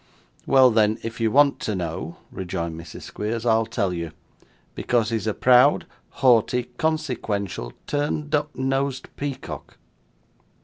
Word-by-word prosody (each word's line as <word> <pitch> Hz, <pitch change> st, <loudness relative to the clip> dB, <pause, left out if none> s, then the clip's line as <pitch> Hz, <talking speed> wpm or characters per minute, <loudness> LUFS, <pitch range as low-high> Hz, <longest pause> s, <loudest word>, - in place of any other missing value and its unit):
'Well, 130 Hz, -2 st, +6 dB
then, 110 Hz, -1 st, +3 dB
if 115 Hz, 0 st, -5 dB
you 115 Hz, -, +3 dB
want 140 Hz, +4 st, +4 dB
to 105 Hz, -, -2 dB
know,' 85 Hz, -2 st, -4 dB, 0.2 s
rejoined 85 Hz, -3 st, -4 dB
Mrs. 80 Hz, 0 st, -9 dB
Squeers, 110 Hz, +2 st, -4 dB
'I'll 115 Hz, -1 st, +3 dB
tell 100 Hz, -4 st, -1 dB
you. 85 Hz, -2 st, -5 dB, 0.6 s
Because 115 Hz, -2 st, 0 dB
he's 110 Hz, -2 st, -1 dB
a 110 Hz, -, +1 dB
proud, 130 Hz, +3 st, +5 dB, 0.4 s
haughty, 125 Hz, 0 st, +4 dB
consequential, 110 Hz, -, -2 dB
turned 150 Hz, +1 st, -2 dB
up 150 Hz, 0 st, 0 dB
nosed 135 Hz, 0 st, -2 dB
peacock. 140 Hz, -2 st, -6 dB
115 Hz, 130 wpm, -24 LUFS, 100-135 Hz, 0.6 s, Well